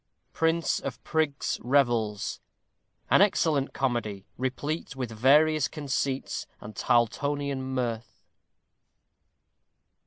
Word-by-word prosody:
Prince 165 +1 +1
of 125 -3 -5
Prigs' 155 -3 -1
Revels. 120 -6 +1 0.7
_An - - +6
excellent 160 -8 +2
Comedy, 115 -7 -2
replete 135 +4 -3
with 125 -3 -4
various 145 +6 +4
conceits 140 -2 -2
and 105 0 -10
Tarltonian 140 +4 +1
mirth. 125 -3 -4
135 Hz, 85 wpm, -27 LUFS, 120-145 Hz, 0.7 s, An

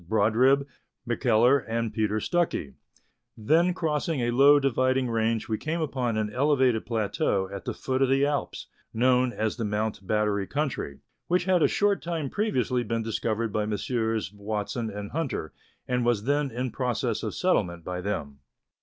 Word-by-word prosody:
Brodribb, 130 +6 +3 0.4
McKellar, 120 +2 +3
and 115 0 -2
Peter 110 -1 0
Stuckey; 170 - -1 0.6
then 160 +11 +3
crossing 160 -3 -1
a 120 0 +1
low 140 +4 +6
dividing 130 -1 +1
range 115 0 0
we 110 -1 -2
came 160 +2 -2
upon 130 -7 -1
an 105 -1 -2
elevated 130 -4 +2
plateau 105 -3 0
at 100 - -7
the - - -2
foot 130 0 -2
of 135 - +3
the 135 +1 +3
Alps, 145 -1 -2 0.3
known 125 +1 +3
as 110 0 -2
the 115 - -2
Mount 105 -2 -2
Battery 105 -2 0
country, 140 - -3 0.3
which 180 0 +1
had 185 -2 +3
a - - +6
short 205 -1 +1
time 165 -5 -3
previously 130 - 0
been 115 0 -2
discovered 115 0 -2
by 105 -1 0
Messrs. 110 -1 -1
Watson 105 +2 -3
and 100 0 -6
Hunter, 145 - -3 0.3
and 125 -1 0
was 120 -4 +1
then 145 +2 +1
in 125 +1 -3
process 125 -2 -1
of - - -4
settlement 85 -1 0
by 90 +1 -4
them. 80 -8 -4
120 Hz, 165 wpm, -27 LUFS, 110-140 Hz, 0.6 s, low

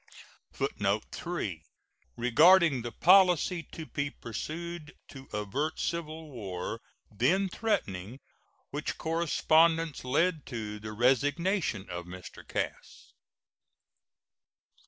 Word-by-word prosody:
[Footnote 100 +1 -1
3: 105 - -4 0.6
Regarding 155 +4 +5
the 120 0 -5
policy 180 0 +5
to 160 - -7
be 145 -1 -2
pursued 155 +7 -6
to 135 -1 -11
avert 105 +10 -2
civil 160 -2 -3
war, 100 -2 -5 0.3
then 155 - +2
threatening, 120 - -2 0.5
which 145 +2 -3
correspondence 165 -1 +2
led 155 +4 +1
to 110 -4 -5
the 110 +1 -7
resignation 135 - +1
of 85 0 -5
Mr. 90 0 -10
Cass. - - -5
145 Hz, 95 wpm, -30 LUFS, 110-170 Hz, 0.6 s, Regarding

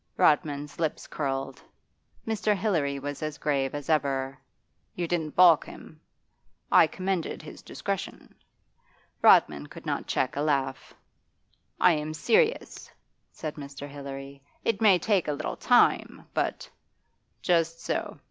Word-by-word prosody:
Rodman's 145 -1 +1
lips 160 -3 -2
curled; 135 -2 -3 0.6
Mr. 215 -1 +1
Hilary 165 -9 0
was 145 +1 -6
as 155 -1 -4
grave 140 -2 -1
as 145 -1 -6
ever. 135 -3 0 0.6
'You 175 -1 -2
didn't 160 -3 -2
balk 175 -4 +7
him?' - - -12 0.7
'I - - +7
commended 185 -1 -3
his - - -10
discretion.' - - -5 0.9
Rodman 75 -1 +5
could - - -12
not - - -2
check 130 - 0
a 140 - -1
laugh. 140 -3 -1 0.8
'I 180 - +6
am 155 0 -3
serious,' 455 - +1 0.4
said 155 -1 -6
Mr. 140 0 -8
Hilary. 140 -1 -8 0.2
'It 225 -1 0
may 205 -4 +6
take 195 -2 +1
a 150 - 0
little 155 +2 -4
time, 245 -1 +2
but - - -2 0.3
' - - -46
'Just 165 -2 +1
so. - - -3
150 Hz, 130 wpm, -27 LUFS, 140-175 Hz, 0.9 s, balk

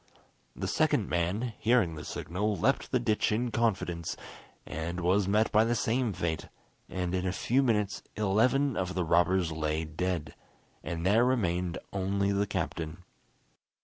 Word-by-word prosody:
The - - -3
second - - +1
man, 100 +8 -1
hearing 110 -7 +3
the 75 -1 -7
signal, 100 +7 -2
leapt 135 +6 +1
the 130 - +3
ditch 110 -3 +1
in 120 +3 0
confidence, 95 -8 -1 0.5
and 85 +3 -4
was 95 +3 +2
met 105 +3 +2
by 110 +1 +5
the 120 +1 +1
same 120 +1 +1
fate, 85 -4 -2 0.4
and 90 -1 -2
in 95 0 0
a - - +1
few 125 +7 +1
minutes 105 -6 +1
eleven 115 +6 +2
of 90 -1 -2
the 90 -2 0
robbers 85 +1 +3
lay 80 0 -1
dead, 80 -2 -3 0.5
and 85 +3 -4
there 105 +5 +5
remained 90 -9 0 0.2
only 100 +1 0
the 100 +1 +1
captain. 80 0 -4
95 Hz, 150 wpm, -30 LUFS, 85-110 Hz, 0.5 s, by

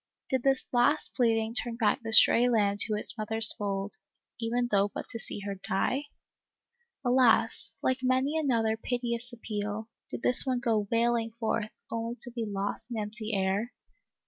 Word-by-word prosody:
Did 260 -1 +1
this 270 0 +2
last 250 +5 +2
pleading 225 -2 +1
turn 240 -1 +1
back 225 -3 +1
the 225 -1 -5
stray 235 +2 +7
lamb 205 -4 +2
to 215 -1 +1
its 210 - +2
mother's 220 +1 +5
fold, 200 -1 -3 0.4
even 240 +1 -1
though 200 -1 +3
but - - -7
to 230 - -4
see 210 - -4
her 200 0 -4
die? 195 +8 -2 1.0
Alas, 245 -2 +2
like 260 0 +1
many 260 +3 +1
another 235 -8 +1
piteous 240 +1 -3
appeal, 215 -2 -5 0.2
did - - -7
this 250 - +5
one 255 -2 -1
go 225 -4 0
wailing 230 -1 +1
forth, 220 -1 -1 0.2
only 230 +1 -3
to 245 - -2
be 230 -2 -4
lost 205 +3 -3
in 235 - -5
empty 215 +1 -3
air 195 +5 -1
230 Hz, 165 wpm, -29 LUFS, 215-245 Hz, 1.0 s, stray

